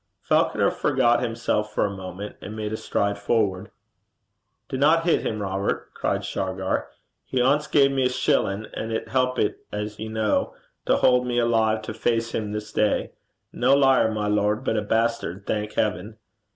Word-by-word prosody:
Falconer -, -, +2 dB
forgot 120 Hz, -4 st, +2 dB
himself 115 Hz, -3 st, -1 dB
for -, -, +2 dB
a 100 Hz, -1 st, -3 dB
moment, 95 Hz, +2 st, -7 dB
and 105 Hz, -, -7 dB
made 105 Hz, 0 st, -4 dB
a -, -, 0 dB
stride 100 Hz, -1 st, -1 dB
forward. 100 Hz, -2 st, 0 dB, 1.0 s
'Dinna 150 Hz, +5 st, +3 dB
hit 165 Hz, 0 st, +2 dB
him, 110 Hz, -, -2 dB
Robert,' 95 Hz, 0 st, -2 dB
cried -, -, -2 dB
Shargar. 95 Hz, 0 st, -2 dB, 0.4 s
'He 130 Hz, -, -2 dB
ance 140 Hz, +4 st, +2 dB
gae 140 Hz, -2 st, +5 dB
me 135 Hz, -2 st, +1 dB
a -, -, -2 dB
shillin', 110 Hz, -6 st, 0 dB
an' 110 Hz, -, -4 dB
it 110 Hz, 0 st, -3 dB
helpit, 125 Hz, -3 st, 0 dB
as 105 Hz, +1 st, -5 dB
ye 110 Hz, -, -4 dB
ken, 110 Hz, -1 st, +1 dB, 0.4 s
to -, -, +4 dB
haud 125 Hz, 0 st, +3 dB
me 120 Hz, -1 st, -1 dB
alive 110 Hz, -2 st, +2 dB
to 110 Hz, -, -5 dB
face 115 Hz, +1 st, 0 dB
him 105 Hz, -2 st, -2 dB
this 105 Hz, 0 st, -5 dB
day. 105 Hz, -1 st, +1 dB, 0.4 s
No 130 Hz, +3 st, +3 dB
liar, 135 Hz, -5 st, +4 dB
my 105 Hz, -1 st, -2 dB
lord, 105 Hz, +3 st, +1 dB
but 110 Hz, -, 0 dB
a 105 Hz, -, +1 dB
bastard, 110 Hz, -3 st, -1 dB
thank 105 Hz, 0 st, -2 dB
heaven.' 105 Hz, +1 st, -2 dB
110 Hz, 170 wpm, -24 LUFS, 105-125 Hz, 1.0 s, gae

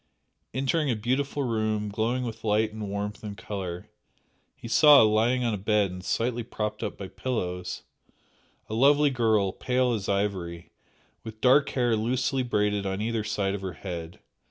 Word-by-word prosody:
Entering 140 Hz, +3 st, 0 dB
a 120 Hz, -, +1 dB
beautiful 135 Hz, +6 st, -1 dB
room 110 Hz, -3 st, -1 dB
glowing 115 Hz, +5 st, -1 dB
with 115 Hz, -3 st, -6 dB
light 110 Hz, 0 st, +1 dB
and 110 Hz, -2 st, -5 dB
warmth 105 Hz, +2 st, -4 dB
and 105 Hz, -1 st, -6 dB
colour, 90 Hz, -4 st, -5 dB, 0.7 s
he -, -, -9 dB
saw, 145 Hz, +3 st, +7 dB
lying 115 Hz, +4 st, +2 dB
on 115 Hz, -2 st, 0 dB
a 105 Hz, -, -3 dB
bed 105 Hz, -1 st, +1 dB
and 90 Hz, 0 st, -8 dB
slightly 120 Hz, +3 st, -1 dB
propped 105 Hz, -2 st, -4 dB
up -, -, -4 dB
by 100 Hz, -, -6 dB
pillows, 90 Hz, -4 st, -4 dB, 0.8 s
a -, -, -6 dB
lovely 145 Hz, +5 st, +4 dB
girl, 110 Hz, -6 st, +2 dB
pale 125 Hz, +3 st, 0 dB
as 105 Hz, -4 st, -3 dB
ivory, 95 Hz, -4 st, -2 dB, 0.5 s
with 110 Hz, -1 st, -9 dB
dark 135 Hz, +4 st, +4 dB
hair 120 Hz, -3 st, +1 dB
loosely 125 Hz, +4 st, 0 dB
braided 105 Hz, -4 st, 0 dB
on 95 Hz, 0 st, -2 dB
either 110 Hz, 0 st, -1 dB
side 100 Hz, -2 st, -1 dB
of 100 Hz, -, -4 dB
her 95 Hz, -2 st, -4 dB
head. 85 Hz, -1 st, -7 dB
110 Hz, 165 wpm, -27 LUFS, 100-125 Hz, 0.8 s, saw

